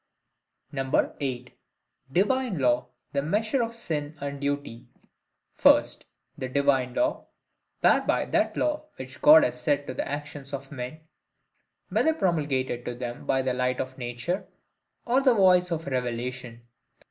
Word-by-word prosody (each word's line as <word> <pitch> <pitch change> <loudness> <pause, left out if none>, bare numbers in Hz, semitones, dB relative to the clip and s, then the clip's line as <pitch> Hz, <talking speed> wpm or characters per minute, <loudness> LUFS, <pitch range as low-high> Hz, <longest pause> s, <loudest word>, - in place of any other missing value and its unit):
8. 130 -2 -1 0.6
Divine 210 - +1
Law 125 -3 +2 0.3
the 140 - +1
Measure 215 - 0
of 230 0 -2
Sin 155 -8 -4
and 140 0 -5
Duty. 140 -4 -3 0.7
First, - - +4 0.3
the 130 - -5
DIVINE 135 -2 +1
LAW, 315 - 0 0.5
whereby - - +3
that - - 0
law 300 0 -1
which 130 +2 -10
God 155 +1 +9
has 125 0 -1
set 145 +2 +1
to 130 - -5
the - - -3
actions 145 -1 -6
of 135 0 -6
men,—whether 155 - -5
promulgated 145 - 0
to 120 - -4
them 120 -1 -6
by 130 0 +2
the 130 -1 0
light 125 0 0
of 130 +1 -5
nature, 120 +9 -3 0.6
or 250 +3 +3
the 260 -3 +4
voice 180 -3 +5
of 165 -1 -3
revelation. 125 -2 -4
140 Hz, 135 wpm, -27 LUFS, 125-170 Hz, 0.7 s, God